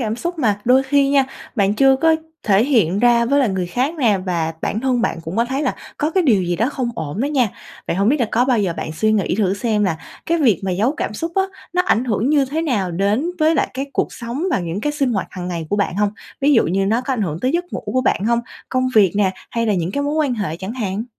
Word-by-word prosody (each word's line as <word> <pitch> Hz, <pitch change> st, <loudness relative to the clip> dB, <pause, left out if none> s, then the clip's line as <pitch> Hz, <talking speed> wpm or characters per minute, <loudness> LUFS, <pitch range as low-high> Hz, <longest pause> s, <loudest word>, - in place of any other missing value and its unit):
cảm 220 Hz, -2 st, -2 dB
xúc 345 Hz, +6 st, -4 dB
mà 210 Hz, -8 st, +1 dB
đôi 255 Hz, +2 st, +5 dB
khi 275 Hz, +1 st, +2 dB
nha, 275 Hz, -1 st, +4 dB, 0.3 s
bạn 205 Hz, -3 st, +2 dB
chưa 270 Hz, +2 st, +5 dB
có 320 Hz, +3 st, +3 dB, 0.3 s
thể 205 Hz, +2 st, +3 dB
hiện 205 Hz, -, +2 dB
ra 235 Hz, 0 st, +4 dB
với 280 Hz, +4 st, +2 dB
lại 250 Hz, -, +2 dB
người 190 Hz, -2 st, -2 dB
khác 255 Hz, -, -1 dB
nè, 215 Hz, -7 st, +3 dB
và 165 Hz, -3 st, -1 dB
bản 220 Hz, -, -1 dB
thân 255 Hz, -2 st, +1 dB
bạn 165 Hz, -, -1 dB
cũng 165 Hz, +5 st, -6 dB
có 235 Hz, -, +3 dB
thấy 265 Hz, +4 st, -2 dB
là -, -, 0 dB, 0.2 s
có 300 Hz, +1 st, 0 dB
cái 370 Hz, +2 st, +2 dB
điều 220 Hz, -, +3 dB
gì 175 Hz, 0 st, -1 dB
đó 230 Hz, +5 st, +1 dB
không 255 Hz, -4 st, -2 dB
ổn 160 Hz, +4 st, -4 dB
đó 275 Hz, -, +1 dB
nha. 265 Hz, -6 st, +2 dB, 0.4 s
Vậy -, -, -1 dB
hổng 200 Hz, +3 st, +2 dB
biết 285 Hz, 0 st, +2 dB
là 235 Hz, -, +2 dB
có 240 Hz, +2 st, +3 dB
bao 255 Hz, -3 st, +2 dB
giờ 190 Hz, -4 st, 0 dB
bạn 155 Hz, -, -4 dB
suy 215 Hz, +6 st, +1 dB
nghĩ 200 Hz, -4 st, +1 dB
thử 195 Hz, -3 st, +2 dB
xem 210 Hz, -1 st, 0 dB
là 165 Hz, -4 st, 0 dB, 0.3 s
cái 335 Hz, +1 st, +1 dB
việc 235 Hz, -, +3 dB
mà 190 Hz, -, -1 dB
giấu 215 Hz, +10 st, +1 dB
cảm 210 Hz, -, -3 dB
xúc 330 Hz, +8 st, -4 dB
á, 385 Hz, -, +3 dB, 0.3 s
nó 360 Hz, 0 st, +2 dB
ảnh 250 Hz, -9 st, +1 dB
hưởng 230 Hz, 0 st, 0 dB
như 290 Hz, -2 st, +4 dB
thế 305 Hz, +5 st, -2 dB
nào 210 Hz, -, 0 dB
đến 205 Hz, -, 0 dB
với 315 Hz, +1 st, +3 dB
lại -, -, +1 dB
cái 270 Hz, +2 st, -3 dB
cuộc -, -, -1 dB
sống 240 Hz, +7 st, -5 dB
và -, -, +2 dB
những 175 Hz, +3 st, -4 dB
cái 295 Hz, +3 st, -1 dB
sinh 275 Hz, -4 st, 0 dB
hoạt 195 Hz, -, -1 dB
hàng 180 Hz, -1 st, -6 dB
ngày 170 Hz, -3 st, -4 dB
của 205 Hz, -, +1 dB
bạn 200 Hz, -2 st, -1 dB
hông? 205 Hz, 0 st, +2 dB, 0.3 s
Ví 285 Hz, +2 st, +4 dB
dụ 230 Hz, -, +4 dB
như 195 Hz, +3 st, 0 dB
nó 225 Hz, +4 st, +2 dB
có 265 Hz, +1 st, -3 dB
ảnh 235 Hz, -, -1 dB
hưởng 165 Hz, -3 st, -3 dB
tới 255 Hz, -, +1 dB
giấc 350 Hz, +1 st, 0 dB
ngủ -, -, -4 dB
của 255 Hz, -, +1 dB
bạn 210 Hz, -5 st, 0 dB
hông, 235 Hz, +1 st, +2 dB, 0.3 s
công 255 Hz, 0 st, 0 dB
việc 200 Hz, -5 st, +5 dB
nè, 200 Hz, -2 st, +3 dB, 0.2 s
hay 230 Hz, 0 st, -1 dB
là 210 Hz, -, +2 dB
những 175 Hz, 0 st, -1 dB
cái 285 Hz, +6 st, -2 dB
mối 290 Hz, +1 st, -1 dB
quan 290 Hz, -5 st, +1 dB
hệ 190 Hz, -7 st, -3 dB
chẳng 190 Hz, +4 st, -6 dB
hạn? 215 Hz, -3 st, -3 dB
230 Hz, 285 wpm, -19 LUFS, 195-270 Hz, 0.4 s, đôi